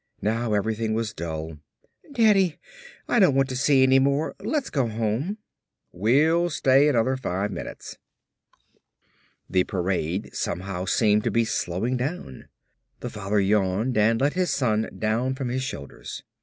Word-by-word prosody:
Now 115 Hz, +1 st, 0 dB
everything 110 Hz, +1 st, -1 dB
was 110 Hz, -2 st, -2 dB
dull. 80 Hz, -3 st, -6 dB, 0.5 s
"Daddy, 210 Hz, -, +3 dB, 0.5 s
I 240 Hz, -, +2 dB
don't 185 Hz, -9 st, +5 dB
want 135 Hz, 0 st, +2 dB
to 130 Hz, -, -4 dB
see 135 Hz, +1 st, +4 dB
any 130 Hz, 0 st, +5 dB
more. 140 Hz, +3 st, +1 dB
Let's 255 Hz, +8 st, -2 dB
go 135 Hz, -5 st, +1 dB
home." 115 Hz, -, -2 dB, 0.5 s
"We'll 150 Hz, -, +2 dB
stay 135 Hz, -2 st, +4 dB
another 130 Hz, -2 st, +2 dB
five 105 Hz, -5 st, -2 dB
minutes." 90 Hz, -, -8 dB, 1.5 s
The 90 Hz, -1 st, +2 dB
parade 90 Hz, -1 st, -2 dB
somehow 90 Hz, +1 st, -3 dB
seemed 105 Hz, 0 st, +2 dB
to -, -, +2 dB
be 115 Hz, 0 st, +1 dB
slowing 110 Hz, +3 st, -1 dB
down. 130 Hz, -, -5 dB, 0.5 s
The -, -, -5 dB
father 105 Hz, 0 st, -1 dB
yawned 100 Hz, +4 st, +1 dB
and 110 Hz, +2 st, +3 dB
let 140 Hz, +2 st, +1 dB
his 180 Hz, -1 st, 0 dB
son 110 Hz, -4 st, 0 dB
down 115 Hz, +5 st, 0 dB
from 130 Hz, -2 st, -4 dB
his 130 Hz, +2 st, -2 dB
shoulders. 70 Hz, -, -7 dB
115 Hz, 140 wpm, -25 LUFS, 100-135 Hz, 1.5 s, don't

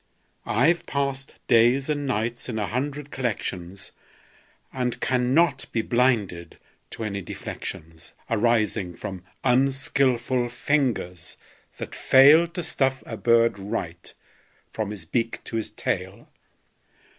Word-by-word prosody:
I've 165 Hz, +10 st, +2 dB
passed 140 Hz, -1 st, -2 dB
days 120 Hz, +3 st, +4 dB
and 145 Hz, -2 st, -1 dB
nights 120 Hz, +1 st, -2 dB
in 110 Hz, -, -3 dB
a 105 Hz, -, 0 dB
hundred 140 Hz, +5 st, -3 dB
collections, 100 Hz, -7 st, -4 dB, 0.8 s
And 125 Hz, -2 st, -2 dB
cannot 130 Hz, +7 st, +2 dB
be 115 Hz, -, 0 dB
blinded 110 Hz, -10 st, 0 dB, 0.3 s
to 115 Hz, -, -6 dB
any 100 Hz, -2 st, -3 dB
deflections 80 Hz, -2 st, -7 dB, 0.2 s
Arising 110 Hz, -5 st, +1 dB
from 95 Hz, -2 st, -7 dB, 0.2 s
unskilful 130 Hz, -1 st, +2 dB
fingers 120 Hz, -, -1 dB, 0.4 s
that -, -, -6 dB
fail 145 Hz, +6 st, +6 dB
To 170 Hz, +1 st, -5 dB
stuff 135 Hz, -3 st, 0 dB
a 115 Hz, -, -6 dB
bird 115 Hz, -2 st, +3 dB
right, 90 Hz, -3 st, -5 dB, 0.6 s
from 110 Hz, -2 st, -3 dB
his 100 Hz, -5 st, -7 dB
beak 115 Hz, +7 st, -2 dB
to 115 Hz, -, -4 dB
his 110 Hz, -, -2 dB
tail. -, -, -3 dB
120 Hz, 115 wpm, -25 LUFS, 105-135 Hz, 0.8 s, fail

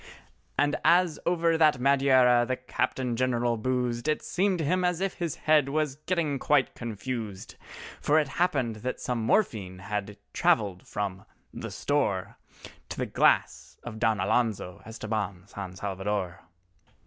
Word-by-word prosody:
And 145 Hz, 0 st, +2 dB
as 170 Hz, 0 st, +4 dB
over 170 Hz, -2 st, +2 dB
that 150 Hz, -5 st, +4 dB
Madeira 130 Hz, -2 st, +4 dB
the 130 Hz, -, 0 dB
Captain 130 Hz, -1 st, -2 dB
General 120 Hz, -1 st, +1 dB
boozed, 125 Hz, +2 st, -1 dB
It 155 Hz, -, 0 dB
seemed 190 Hz, 0 st, +1 dB
to 160 Hz, -, -2 dB
him 180 Hz, +4 st, +1 dB
as 180 Hz, -1 st, +1 dB
if 195 Hz, 0 st, -1 dB
his 170 Hz, -3 st, -3 dB
head 150 Hz, -3 st, +3 dB
was 150 Hz, -2 st, -1 dB
getting 160 Hz, -6 st, 0 dB
quite 145 Hz, -2 st, +2 dB
confused, 115 Hz, -3 st, -5 dB, 0.5 s
For 150 Hz, -, +3 dB
it 155 Hz, -2 st, +3 dB
happened 135 Hz, -8 st, 0 dB
that 125 Hz, +4 st, -4 dB
some 125 Hz, -2 st, -2 dB
morphine 110 Hz, -, 0 dB
had 105 Hz, +1 st, -4 dB, 0.2 s
travelled 100 Hz, -4 st, +1 dB
from 95 Hz, -2 st, -4 dB, 0.3 s
"the -, -, -6 dB
store" 135 Hz, -11 st, -1 dB, 0.5 s
To -, -, -6 dB
the -, -, -1 dB
glass -, -, +1 dB
of 110 Hz, -2 st, -7 dB
Don 110 Hz, -1 st, +2 dB
Alonzo 105 Hz, -2 st, 0 dB
Estabán 105 Hz, -5 st, -4 dB
San 95 Hz, -2 st, -7 dB
Salvador. 95 Hz, -2 st, -3 dB
125 Hz, 145 wpm, -28 LUFS, 105-150 Hz, 0.5 s, as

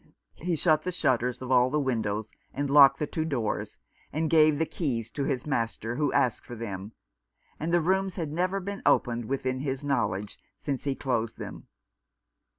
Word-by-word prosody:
He 175 Hz, +1 st, 0 dB
shut 155 Hz, -1 st, +3 dB
the 180 Hz, -, -3 dB
shutters 125 Hz, -6 st, 0 dB
of 130 Hz, -, -5 dB
all 125 Hz, 0 st, +5 dB
the 150 Hz, +3 st, +1 dB
windows, 110 Hz, -5 st, -1 dB, 0.2 s
and 140 Hz, 0 st, -1 dB
locked 140 Hz, -1 st, +8 dB
the 150 Hz, -, -1 dB
two 160 Hz, +2 st, -2 dB
doors, 130 Hz, -9 st, -2 dB, 0.3 s
and 160 Hz, +2 st, -1 dB
gave 155 Hz, -2 st, +5 dB
the 160 Hz, -, +1 dB
keys 120 Hz, -, -3 dB
to 140 Hz, -, -2 dB
his 130 Hz, -4 st, -1 dB
master, 115 Hz, -4 st, -2 dB
who 145 Hz, -2 st, +1 dB
asked 130 Hz, -5 st, +1 dB
for 120 Hz, -, -8 dB
them; 105 Hz, -2 st, -6 dB, 0.7 s
and 160 Hz, +3 st, -2 dB
the 175 Hz, 0 st, +4 dB
rooms 190 Hz, +3 st, +1 dB
had 165 Hz, -5 st, -3 dB
never 185 Hz, +4 st, 0 dB
been 200 Hz, +1 st, -5 dB
opened 120 Hz, -1 st, +2 dB
within 130 Hz, 0 st, -2 dB
his 135 Hz, 0 st, -3 dB
knowledge 105 Hz, -8 st, -1 dB, 0.2 s
since 140 Hz, -2 st, -3 dB
he 140 Hz, -1 st, 0 dB
closed 115 Hz, -5 st, -1 dB
them. -, -, -8 dB
135 Hz, 180 wpm, -28 LUFS, 120-155 Hz, 0.7 s, locked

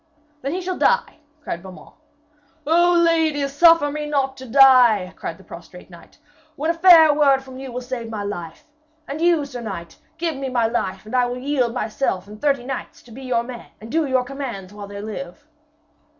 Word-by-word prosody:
'Then 275 Hz, -, -3 dB
he 370 Hz, -, -3 dB
shall 370 Hz, 0 st, -4 dB
die!' 480 Hz, -8 st, +1 dB, 0.2 s
cried 170 Hz, -, -5 dB
Beaumains. 190 Hz, 0 st, -13 dB, 0.7 s
'O 345 Hz, +3 st, +4 dB
lady, 315 Hz, -4 st, +1 dB
suffer 290 Hz, +1 st, +4 dB
me 300 Hz, 0 st, -4 dB
not 270 Hz, -2 st, 0 dB
to 260 Hz, -1 st, -11 dB
die!' 245 Hz, -7 st, +5 dB
cried -, -, -6 dB
the -, -, -17 dB
prostrate -, -, -13 dB
knight, -, -, -16 dB, 0.4 s
'when 315 Hz, +3 st, 0 dB
a -, -, -2 dB
fair 330 Hz, -3 st, +7 dB
word 275 Hz, -2 st, +3 dB
from 260 Hz, -1 st, -11 dB
you 265 Hz, -1 st, -7 dB
will 250 Hz, +1 st, -5 dB
save 245 Hz, -2 st, -6 dB
my 215 Hz, -2 st, -5 dB
life. 175 Hz, -, -7 dB, 0.4 s
And 290 Hz, +3 st, -5 dB
you, 335 Hz, -4 st, +3 dB
sir 250 Hz, -3 st, -8 dB
knight, 170 Hz, -7 st, -7 dB, 0.2 s
give 335 Hz, -2 st, -2 dB
me 270 Hz, -1 st, -4 dB
my 240 Hz, -2 st, +1 dB
life, 225 Hz, -4 st, -2 dB
and 220 Hz, -, -6 dB
I 250 Hz, -1 st, +3 dB
will 245 Hz, +1 st, -4 dB
yield 255 Hz, -3 st, -1 dB
myself 215 Hz, -5 st, -2 dB
and 210 Hz, +1 st, -12 dB
thirty 275 Hz, -4 st, +1 dB
knights 265 Hz, 0 st, -6 dB
to 240 Hz, -, -17 dB
be 255 Hz, +4 st, -10 dB
your 250 Hz, -3 st, -1 dB
men 240 Hz, -1 st, -9 dB
and 220 Hz, +1 st, -11 dB
do 320 Hz, -2 st, +1 dB
your 260 Hz, -1 st, +1 dB
commands 245 Hz, -8 st, -7 dB
while 205 Hz, -1 st, -9 dB
they 200 Hz, 0 st, -8 dB
live.' 205 Hz, +2 st, -8 dB
260 Hz, 200 wpm, -21 LUFS, 225-295 Hz, 0.7 s, fair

